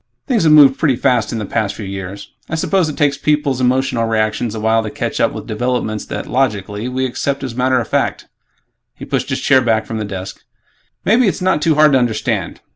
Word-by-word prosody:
Things 235 - +1
have 155 - +5
moved 145 -3 +7
pretty 145 -5 +2
fast 120 -4 +1
in 115 - -3
the 105 - -3
past 105 0 -2
few 105 - -7
years. 95 +1 -7 0.2
I 160 - -2
suppose 175 +1 +1
it 150 - -6
takes 145 -2 +1
people's 145 -4 0
emotional 125 -2 +1
reactions 110 0 -1
a - - -4
while 110 +1 +2
to 110 - -5
catch - - -4
up - - +2
with - - -7
developments 110 -1 -2
that, - - -5
logically, 105 -4 -1
we 130 +1 -1
accept 135 +2 -2
as 130 -3 -4
matter 130 +1 +1
of 115 - -4
fact." - - -1 0.7
He - - -9
pushed - - -2
his - - -2
chair 130 - +4
back 110 -2 +1
from 110 0 -5
the - - -2
desk, 95 -2 -7 0.6
"Maybe 230 +3 +4
it's 190 - -1
not 185 -4 +1
too 160 0 +2
hard 150 0 +5
to 135 - +4
understand. 120 -3 -2
125 Hz, 220 wpm, -17 LUFS, 110-140 Hz, 0.7 s, moved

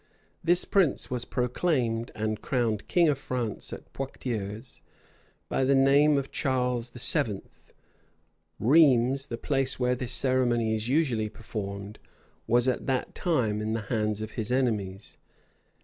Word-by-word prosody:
This 175 +1 +3
prince 185 -11 +1
was 125 -2 -2
proclaimed 125 -3 0
and 110 0 -2
crowned 115 -5 -1
king 175 -3 +4
of 145 -3 +1
France 125 -6 -4
at - - -10
Poictiers, 110 -7 -5 0.7
by - - 0
the 135 +1 +3
name 140 +2 +5
of 135 -1 -3
Charles 125 -2 -1
VII. 120 -3 +1 1.2
Rheims, 135 0 +4
the 115 - -4
place 135 0 0
where 125 0 +2
this 125 -1 -3
ceremony 120 -4 +1
is 110 +2 -3
usually 130 -7 +1
performed, 100 -2 -7 0.5
was 120 +2 +3
at 130 - -1
that 130 -2 -1
time 115 - 0
in 110 +1 -2
the 115 - -1
hands 105 -1 0
of 110 0 -5
his 110 0 -4
enemies. 105 -7 -1
125 Hz, 135 wpm, -27 LUFS, 110-135 Hz, 1.2 s, name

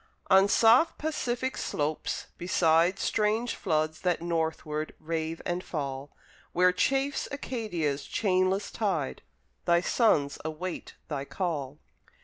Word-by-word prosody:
On 190 +1 +7
soft 235 +10 +5
Pacific 260 -4 -2
slopes, 150 +1 -2
beside 175 0 +3
Strange 220 +4 0
floods 155 0 -1
that 180 -2 +1
northward 160 -2 -2
rave 160 0 -3
and 175 +1 -2
fall, 140 -3 -4 0.4
Where 180 +1 +5
chafes 270 +8 +1
Acadia's 185 - -2
chainless 190 0 +1
tide 185 -11 -1 0.4
Thy 170 0 +4
sons 165 - +2
await 160 +3 -5
thy 140 -3 -3
call. 150 -6 -3
175 Hz, 110 wpm, -28 LUFS, 155-210 Hz, 0.4 s, On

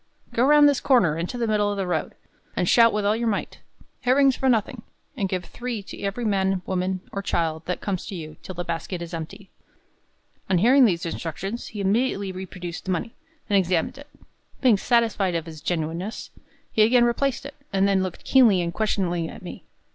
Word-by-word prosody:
"Go 235 - +2
round 295 +2 +7
this 285 -3 +2
corner 235 - +3
into 170 +9 -4
the 235 - 0
middle 210 -2 +1
of 205 - -3
the 195 - -1
road, 175 -3 -2 0.4
and 180 - 0
shout 230 +2 +6
with 210 -1 -1
all 210 +1 +3
your 235 +1 -1
might, 210 - -2 0.4
'Herrings 265 +1 +4
for 265 - +1
nothing!' 225 -4 0 0.3
and 200 -7 -1
give 185 -2 -2
three 240 -2 -5
to - - -10
every 205 +4 -3
man, 190 -3 +1
woman, 185 0 -1
or 200 - -3
child 160 -4 -2
that 180 - -2
comes 190 -3 -3
to 195 - -6
you, 155 -3 -7
till 185 - -8
the 175 - -3
basket 175 +2 -4
is 170 - -9
emptied." 165 +4 -7 1.0
On 185 - +3
hearing 250 +8 +6
these 175 -6 +1
instructions, 175 +7 -5
he 210 - -6
immediately 200 -1 0
reproduced 180 -2 -7
the 190 - -1
money, 185 +6 -2 0.3
and 205 - +1
examined 185 +6 0
it. 285 - -12 0.5
Being 250 -5 +5
satisfied 220 -5 +1
of 165 0 -3
its 160 -2 -9
genuineness, 170 +5 -3 0.4
he 220 - +2
again 240 +2 +5
replaced 265 +3 0
it, 280 - -7 0.2
and 195 0 +2
then 195 -1 +2
looked 185 -2 -5
keenly 235 -8 +5
and 170 0 -3
questioningly 175 -6 -1
at - - -11
me. - - -9
195 Hz, 200 wpm, -24 LUFS, 175-235 Hz, 1.0 s, round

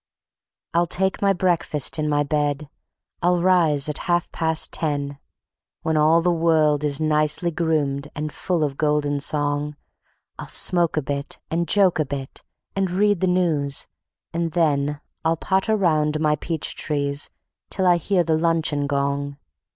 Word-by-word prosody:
I'll 170 +1 +2
take 190 +2 -1
my 200 -1 +4
breakfast 170 -5 0
in 150 0 0
my 145 0 +2
bed, 145 0 -1 0.5
I'll 175 +1 +2
rise 170 -5 +3
at 150 - -2
half 175 -1 +1
past 160 -1 0
ten, 145 -3 -3 0.6
When 160 - 0
all 155 +2 +4
the 180 - +3
world 155 -3 +2
is 145 -1 +1
nicely 155 +2 +2
groomed 150 -4 -1
and 150 0 -4
full 175 -4 -1
of 140 -2 -2
golden 150 -1 0
song; 145 0 0 0.6
I'll - - -6
smoke 175 -3 +2
a 155 - +1
bit 140 +1 -4
and 170 +1 0
joke 195 -5 +3
a 155 - +2
bit, 135 -1 -6 0.3
and 195 -1 0
read 205 +1 +2
the 185 - +1
news, 160 -6 0 0.5
and 165 -1 -2
then 150 -3 +1 0.2
I'll 165 +1 +1
potter 190 +6 +1
round 155 -6 +1
my 150 -1 +2
peach 160 +1 -3
trees 140 -1 -2 0.4
till 190 - -2
I 175 -1 +5
hear 180 +2 +1
the 160 -1 +1
luncheon 160 -3 +1
gong. 140 0 -2
155 Hz, 155 wpm, -22 LUFS, 145-170 Hz, 0.6 s, I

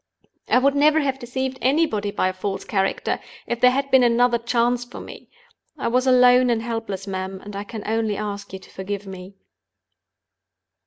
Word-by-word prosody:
I - - +4
would 275 +2 +3
never 300 +2 +4
have 270 -2 -1
deceived 260 +1 -4
anybody 255 -7 +1
by 200 -2 0
a - - -4
false 195 +1 -4
character, 195 -2 -1 0.3
if 240 - -3
there 250 - +6
had 275 +2 -1
been 265 -1 +6
another 240 0 +3
chance 240 +1 +1
for 245 - -10
me. - - -11 0.5
I - - -1
was 255 +2 +1
alone 250 0 +6
and 225 -1 0
helpless, 225 -5 -4
ma'am; 190 -1 -5
and 205 0 -8
I 200 - -4
can 210 0 -8
only 220 -1 -1
ask 205 -1 -5
you 190 - -6
to 190 - -17
forgive 200 +1 -5
me." 190 0 -10
235 Hz, 180 wpm, -22 LUFS, 200-255 Hz, 0.5 s, there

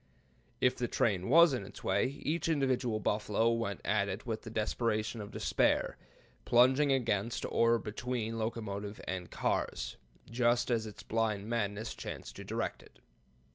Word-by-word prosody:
If 125 - +3
the 120 - -1
train 95 -5 0
was 165 +1 +7
in 125 - -2
its - - -11
way, 95 +4 +2 0.2
each 165 +2 0
individual 130 -7 +1
buffalo 105 +2 +1
went 115 -3 -2
at 100 -1 +2
it 95 +5 -5
with 110 -2 -3
the 115 - -8
desperation 110 0 -1
of 100 - -7
despair, - - +1 0.5
plunging 130 +4 +5
against 115 -4 0
or 115 0 +3
between 115 +1 -3
locomotive 105 -2 -4
and 90 -1 -3
cars, - - -2 0.3
just 120 +1 +2
as 110 -2 +1
its 105 - -10
blind 110 -2 -1
madness 110 -1 -2
chanced - - -7
to - - -7
direct - - -3
it. - - -19
115 Hz, 150 wpm, -32 LUFS, 105-120 Hz, 0.5 s, was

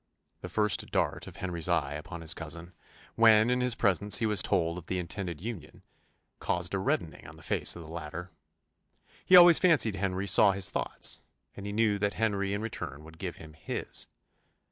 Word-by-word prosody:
The - - -7
first 105 -3 0
dart - - -1
of - - -10
Henry's 90 -2 -3
eye 75 -5 0
upon 80 +3 -8
his 80 0 +1
cousin, 85 +2 -8 0.4
when, 110 0 +5
in 125 0 +1
his 125 -1 0
presence, 100 -2 +3
he 115 - -1
was 105 -3 +4
told 85 -3 0
of 85 - -16
the 95 - -2
intended 90 -1 -3
union, 90 -8 -8 0.6
caused 90 +1 -2
a 95 - 0
reddening 85 -3 -2
on - - -12
the - - -15
face - - -1
of 85 - -9
the - - -12
latter: 85 +2 -7 0.9
he 185 - +5
always 175 -2 +9
fancied 155 - +4
Henry 95 0 -2
saw 100 +1 +5
his 95 -1 -2
thoughts; - - -2 0.4
and 100 - -8
he - - -4
knew 105 -1 +1
that 100 0 -1
Henry 100 -3 -1
in 100 +2 -3
return 75 -10 -6
would 80 +1 -15
give 90 -3 -5
him 80 -1 -12
his. 80 - -5
95 Hz, 190 wpm, -29 LUFS, 85-105 Hz, 0.9 s, always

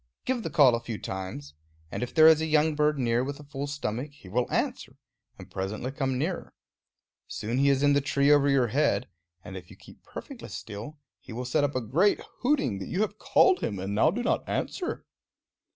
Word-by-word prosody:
Give 255 -2 0
the - - -4
call 140 -6 +6
a 115 - +1
few 115 -2 -6
times, 95 -9 -6 0.4
and - - -4
if 125 - -3
there 155 - +6
is 160 -1 +7
a 160 - -1
young 155 0 +3
bird 150 0 +2
near 120 -1 +1
with 140 +2 -5
a - - -10
full 140 -1 -5
stomach, 140 -2 -3
he 140 - -16
will 120 +5 -1
answer, - - -2 0.4
and - - -12
presently 105 +7 -4
come 135 -2 -1
nearer. 165 +6 -3 0.7
Soon 115 +4 -3
he 140 +1 +4
is 140 0 +2
in 145 0 +5
the 140 - +3
tree 140 +1 +2
over 145 -1 +5
your 130 -4 +3
head, 135 0 +1 0.4
and 95 - -8
if 90 -2 -9
you - - -13
keep - - -17
perfectly - - -9
still 110 +8 -8 0.2
he - - -13
will 125 +2 -4
set 145 +4 +1
up 145 -1 0
a 130 - 0
great 165 - +2 0.2
hooting 245 - +1
that 95 - -6
you 185 - -1
have 215 0 -2
called 375 -1 +4
him 100 - -3
and 95 +2 -4
now 110 +9 +4
do 230 +8 -2
not - - +1
answer. 360 - -3
140 Hz, 215 wpm, -27 LUFS, 115-150 Hz, 0.7 s, is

